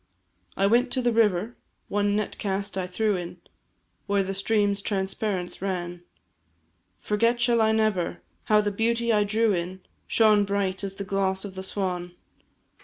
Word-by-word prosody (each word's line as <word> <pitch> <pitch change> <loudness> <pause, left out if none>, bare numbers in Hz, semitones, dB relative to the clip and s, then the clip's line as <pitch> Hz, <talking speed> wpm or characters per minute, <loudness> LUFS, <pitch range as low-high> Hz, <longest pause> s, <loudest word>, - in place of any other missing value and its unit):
I 195 - +3
went 240 +5 +3
to 260 - 0
the 240 - +3
river, 220 -1 +2 0.3
one 205 0 +1
net 210 -1 -2
cast 200 0 -2
I 185 -1 -2
threw 210 +3 0
in, 175 -1 -5 0.7
Where 200 -1 +2
the 195 +1 -3
stream's 200 0 +1
transparence 190 -2 -2
ran, 175 -2 -3 1.0
Forget 230 +3 +1
shall 240 -1 +3
I 220 0 +4
never, 205 - 0 0.2
how 210 0 +4
the 205 -1 -1
beauty 230 +2 +1
I 210 -1 +4
drew 215 +1 +2
in, 180 +1 -3 0.3
Shone 215 -2 +4
bright 200 -1 -1
as 195 -1 -4
the 200 - -5
gloss 190 0 -1
of 195 - -7
the 190 - -6
swan. 180 -2 -3
200 Hz, 160 wpm, -26 LUFS, 190-220 Hz, 1.0 s, I